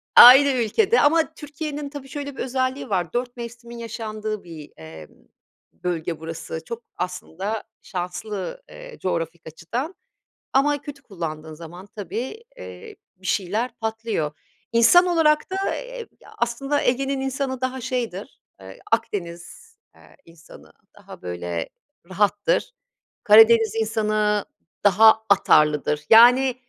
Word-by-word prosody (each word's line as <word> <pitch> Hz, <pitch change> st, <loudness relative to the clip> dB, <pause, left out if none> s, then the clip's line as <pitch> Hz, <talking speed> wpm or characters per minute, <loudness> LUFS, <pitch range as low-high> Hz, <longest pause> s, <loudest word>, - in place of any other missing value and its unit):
Aynı 270 Hz, +3 st, +10 dB
ülkede 270 Hz, -, +2 dB
ama 320 Hz, +2 st, +3 dB
Türkiye'nin 295 Hz, -1 st, -6 dB
tabii 280 Hz, -2 st, -9 dB
şöyle 285 Hz, -1 st, -6 dB
bir -, -, -9 dB
özelliği 260 Hz, 0 st, -2 dB
var, 180 Hz, -4 st, -1 dB
dört 245 Hz, 0 st, -3 dB
mevsimin 235 Hz, 0 st, -9 dB
yaşandığı 215 Hz, -2 st, -5 dB
bir, 160 Hz, -4 st, -11 dB
emm, 80 Hz, -1 st, -11 dB, 0.6 s
bölge 170 Hz, -2 st, -4 dB
burası. 160 Hz, 0 st, -6 dB
Çok 235 Hz, 0 st, -7 dB
aslında 185 Hz, +4 st, -4 dB, 0.2 s
şanslı, 190 Hz, -, -5 dB
eee, -, -, -11 dB
coğrafik 170 Hz, -2 st, -3 dB
açıdan 235 Hz, -, -5 dB, 0.6 s
ama 290 Hz, +2 st, +2 dB
kötü 285 Hz, -1 st, -9 dB
kullandığın 160 Hz, -, -7 dB
zaman 170 Hz, +4 st, -11 dB
tabii, 250 Hz, -, -5 dB
eee, 455 Hz, -3 st, -11 dB, 0.2 s
bir 190 Hz, +1 st, -12 dB
şeyler 210 Hz, +7 st, -1 dB
patlıyor. 220 Hz, -8 st, -2 dB, 0.4 s
İnsan 235 Hz, +11 st, +6 dB
olarak 320 Hz, -3 st, +2 dB
da, 380 Hz, -, -3 dB, 0.2 s
eee, -, -, -7 dB, 0.3 s
aslında 275 Hz, +5 st, -1 dB
Ege'nin 270 Hz, +2 st, 0 dB
insanı 265 Hz, -1 st, -3 dB
daha 260 Hz, 0 st, -3 dB
şeydir, 235 Hz, -6 st, -4 dB, 0.2 s
eee, 95 Hz, 0 st, -12 dB
Akdeniz, 210 Hz, -, -3 dB, 0.2 s
eee, -, -, -20 dB
insanı 165 Hz, -1 st, -17 dB, 0.3 s
daha, -, -, -13 dB
böyle, 85 Hz, -1 st, -4 dB, 0.4 s
rahattır. 205 Hz, -, 0 dB, 0.5 s
Karadeniz 225 Hz, 0 st, +6 dB
insanı 215 Hz, -2 st, 0 dB, 0.4 s
daha 220 Hz, +2 st, +6 dB
atarlıdır. 150 Hz, -6 st, +3 dB
Yani, 245 Hz, +3 st, +7 dB
225 Hz, 115 wpm, -23 LUFS, 180-270 Hz, 0.6 s, Aynı